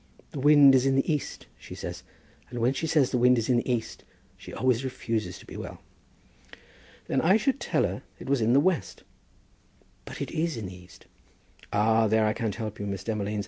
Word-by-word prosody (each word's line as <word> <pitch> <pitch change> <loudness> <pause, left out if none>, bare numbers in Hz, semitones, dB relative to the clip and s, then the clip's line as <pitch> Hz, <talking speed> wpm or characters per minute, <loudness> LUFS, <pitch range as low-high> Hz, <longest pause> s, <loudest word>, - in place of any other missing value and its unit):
The 145 - -6
wind 145 -1 +7
is 130 0 +4
in 135 - +2
the 135 +4 +1
east, 150 - -5
she - - -10
says, - - -6 0.5
and 120 - -7
when 120 +3 +2
she 160 +4 -3
says 150 -5 +2
the 125 - +1
wind 125 +1 +5
is 115 +1 -2
in 125 - +4
the 120 - -1
east 115 -2 -3 0.3
she - - -12
always 125 0 0
refuses 115 -4 -3
to - - -15
be - - -11
well." - - -7 1.3
"Then 135 - 0
I 185 +6 +4
should 270 +4 0
tell - - 0
her - - -2 0.2
it - - -11
was 135 -2 +1
in 115 +2 +2
the 135 - +6
west." 180 +3 -1 1.0
"But - - -9
it - - -4
is 160 -3 -1
in 110 - -5
the 90 0 -8
east." 90 0 -16 0.7
"Ah, 110 +2 +3
there 110 +1 +2
I 105 - +1
can't 110 -3 -3
help 110 -2 -6
you, 100 - -4
Miss 100 -1 -4
Demolines. 105 -1 -2
120 Hz, 215 wpm, -27 LUFS, 110-140 Hz, 1.3 s, wind